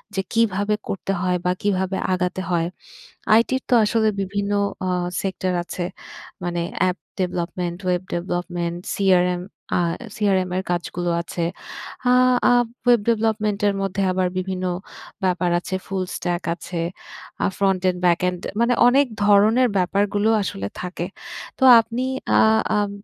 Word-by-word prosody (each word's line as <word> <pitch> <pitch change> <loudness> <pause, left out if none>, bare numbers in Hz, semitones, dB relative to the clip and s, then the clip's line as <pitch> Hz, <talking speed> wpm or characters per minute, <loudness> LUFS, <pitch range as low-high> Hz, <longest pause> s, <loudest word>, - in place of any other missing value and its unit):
যে 195 - +1
কিভাবে 210 -2 +2
করতে 195 0 -3
হয় 180 -1 +1
বা 180 - +3
কিভাবে 190 -1 0 0.2
আগাতে 180 0 -1
হয়। 170 -1 +1 0.7
আইটির 255 +4 +3
তো 250 - +5
আসলে 220 +1 +2
বিভিন্ন 200 +1 -2 0.3
আ - - 0 0.3
সেক্টর 190 -1 -2
আছে। 175 0 -4 0.6
মানে 175 -1 -1 0.2
app 185 -1 +2 0.2
development, 175 -1 -2
web 180 0 +1
development, 175 -1 -3 0.2
CRM 180 -2 +2 0.4
আ - - +2 0.4
সিআরএম 190 -3 +1
এর 190 - 0
কাজগুলো 175 0 -2
আছে। 170 0 -3 0.7
আ - - +6 0.4
আ - - +6 0.3
ওয়েব 240 -2 +6
ডেভেলপমেন্ট 215 -2 +1
এর 200 - +1
মধ্যে 195 0 -1
আবার 185 0 +1
বিভিন্ন 185 0 -3 0.6
ব্যাপার 180 -1 +1
আছে। 185 +2 -5
ফুল 190 -1 -2
স্ট্যাক 175 0 -2
আছে, 170 -1 -6 0.6
আ - - +4
ফ্রন্ট 195 -2 +2
এন্ড 180 -1 -1
ব্যাক 175 -1 +4
এন্ড, 180 -1 -4 0.2
মানে 240 +1 +3
অনেক 275 +3 +4 0.2
ধরনের 215 +5 +5
ব্যাপারগুলো 200 +3 +1
আসলে 100 - -4
থাকে। 180 -1 -4 0.5
তো 265 - +2 0.2
আপনি 230 +3 -3 0.4
আ - - +6 0.3
আম 205 -1 +1
185 Hz, 140 wpm, -22 LUFS, 180-205 Hz, 0.7 s, আ